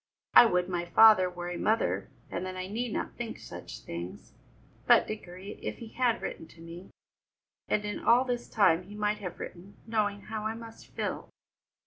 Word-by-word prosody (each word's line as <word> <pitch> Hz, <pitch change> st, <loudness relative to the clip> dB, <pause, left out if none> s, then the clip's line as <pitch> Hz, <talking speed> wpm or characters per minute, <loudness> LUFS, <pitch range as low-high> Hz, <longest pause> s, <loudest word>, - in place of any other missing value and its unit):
"I 240 Hz, -, +10 dB
would 180 Hz, -4 st, +1 dB
my 175 Hz, -2 st, -1 dB
father 185 Hz, +1 st, +7 dB
were 175 Hz, 0 st, -6 dB
a 175 Hz, -, -4 dB
mother, 220 Hz, +1 st, +1 dB, 0.2 s
and -, -, -3 dB
then 185 Hz, 0 st, -5 dB
I 185 Hz, -, -3 dB
need 225 Hz, +5 st, -3 dB
not -, -, -3 dB
think 240 Hz, -2 st, -5 dB
such -, -, -9 dB
things. 85 Hz, +2 st, -7 dB, 0.5 s
But, -, -, +7 dB
Dickory, 195 Hz, -1 st, -8 dB
if -, -, -4 dB
he 230 Hz, -, -9 dB
had 245 Hz, 0 st, +2 dB
but -, -, -10 dB
written 160 Hz, -, -5 dB
to 165 Hz, -, -18 dB
me! 170 Hz, +3 st, -10 dB, 0.8 s
And 210 Hz, -, 0 dB
in 205 Hz, -, -3 dB
all 245 Hz, +3 st, +4 dB
this 245 Hz, -1 st, -3 dB
time 185 Hz, -5 st, +3 dB
he 205 Hz, +2 st, -11 dB
might 210 Hz, 0 st, 0 dB
have 180 Hz, -3 st, -6 dB
written, 185 Hz, +3 st, -9 dB
knowing 210 Hz, -2 st, 0 dB
how 215 Hz, +1 st, -4 dB
I 220 Hz, -, -3 dB
must 230 Hz, 0 st, -11 dB
feel." -, -, -4 dB
205 Hz, 190 wpm, -30 LUFS, 180-225 Hz, 0.8 s, I